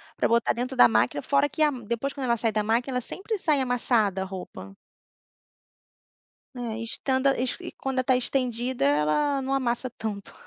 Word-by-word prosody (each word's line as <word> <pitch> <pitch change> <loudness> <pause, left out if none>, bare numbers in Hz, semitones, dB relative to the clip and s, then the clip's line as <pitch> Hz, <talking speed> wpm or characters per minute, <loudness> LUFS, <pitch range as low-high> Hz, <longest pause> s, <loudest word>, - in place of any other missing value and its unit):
pra - - +1
botar 235 0 +2
dentro 255 +2 -3
da 120 - +8
máquina", 120 +5 +1
fora 280 +1 +2
que 315 - -5
a 305 - +6
m 245 -5 -8
depois 235 +5 -2
quando 275 -3 -4
ela 235 -1 +2
sai 225 0 0
da 215 0 0
máquina, 240 +4 0
ela - - -1
sempre 405 - -4
sai 305 -6 +2
amassada, 230 -6 +1
a - - -2
roupa. 180 - -9 1.8
Né, 235 -3 -4
estanda 265 +3 +1
is 255 0 -1
e 350 -1 -7
quando 265 -1 -2
tá 255 0 +3
estendida 250 - -1
ela, 155 - +2
não 270 +1 -2
amassa 255 -1 -1
tanto. 220 -4 -6
245 Hz, 185 wpm, -26 LUFS, 220-270 Hz, 1.8 s, da